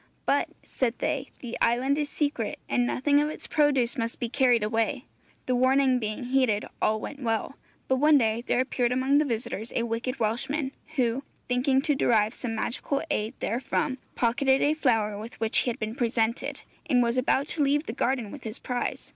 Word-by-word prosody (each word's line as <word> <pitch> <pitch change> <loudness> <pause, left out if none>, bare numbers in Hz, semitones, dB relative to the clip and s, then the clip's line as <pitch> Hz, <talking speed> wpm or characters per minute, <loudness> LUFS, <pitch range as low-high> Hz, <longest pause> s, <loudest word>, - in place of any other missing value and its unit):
'But,' - - +2
said 245 -3 -1
they, 275 -2 -1
'the 240 -2 -5
island 260 +5 +2
is 295 -1 -1
secret, 295 -1 -1
and 245 -1 +1
nothing 285 +3 +2
of 300 - 0
its - - -5
produce 275 -4 +2
must 230 0 -2
be 240 -3 -2
carried 245 -2 +3
away.' 225 +1 0 0.4
The 255 - 0
warning 260 +1 +3
being 215 +2 -3
heeded, 250 -4 +1 0.2
all 215 0 +2
went 285 +5 -7
well. 225 +2 -1 0.3
But 260 - +2
one 300 +2 +6
day 225 -2 +1
there 245 - 0
appeared 250 -2 0
among 260 +3 +3
the 305 - +2
visitors 230 -2 -3
a 235 - +1
wicked 235 +3 -3
Welshman, 265 +6 -1 0.2
who, 250 -1 +1 0.3
thinking 260 +2 +2
to 295 - +2
derive 225 -4 +2
some 230 -3 -4
magical 265 +5 -2
aid 220 -1 -1
therefrom, 255 +3 -1 0.2
pocketed 265 +3 +2
a 295 - +3
flower 225 -9 +1
with 225 +3 -9
which 225 0 +2
he - - 0
had 235 - -3
been 215 0 -3
presented, 235 +2 -1 0.3
and 250 -4 +4
was 235 0 0
about 265 +2 +1
to 315 - -1
leave 290 +2 +2
the 225 - -4
garden 245 -4 -1
with - - -10
his 220 +1 -5
prize. 245 -1 -3
250 Hz, 190 wpm, -27 LUFS, 230-275 Hz, 0.4 s, one